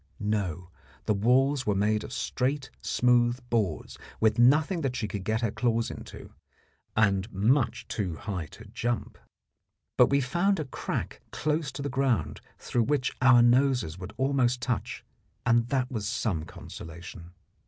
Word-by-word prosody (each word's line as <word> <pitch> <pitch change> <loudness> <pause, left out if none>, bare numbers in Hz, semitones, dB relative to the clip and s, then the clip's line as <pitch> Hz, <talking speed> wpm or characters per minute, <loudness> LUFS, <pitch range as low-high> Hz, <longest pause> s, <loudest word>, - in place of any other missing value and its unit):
No; 95 -5 -2 0.3
the - - +2
walls 130 +6 +2
were 105 - +2
made 105 +2 +1
of - - -8
straight, 135 +2 -2
smooth 120 0 +2
boards 105 -9 -1 0.2
with 110 +1 +2
nothing 155 +8 +4
that 135 -4 -1
she 115 -4 -2
could 100 -2 -5
get 110 +3 0
her 115 -3 0
claws 115 -1 0
into, - - -10 0.6
and 100 0 +2
much 120 +7 +1
too 95 -6 -2
high 90 -3 -4
to 110 - -13
jump. 120 +3 -3 0.8
But - - +7
we 140 - +3
found 175 +9 +1
a 155 - -2
crack 130 - -4
close 150 -1 -1
to 140 - -5
the - - -1
ground 125 - 0 0.2
through 120 -2 0
which 140 -1 0
our 125 -2 +7
noses 120 - +3
would 95 +3 -8
almost 130 -2 +2
touch, 125 -2 -3 0.4
and 120 -1 +3
that 130 -1 0
was 110 -4 -3
some 100 -8 -1
consolation. 85 +2 -10
120 Hz, 155 wpm, -28 LUFS, 100-130 Hz, 0.8 s, But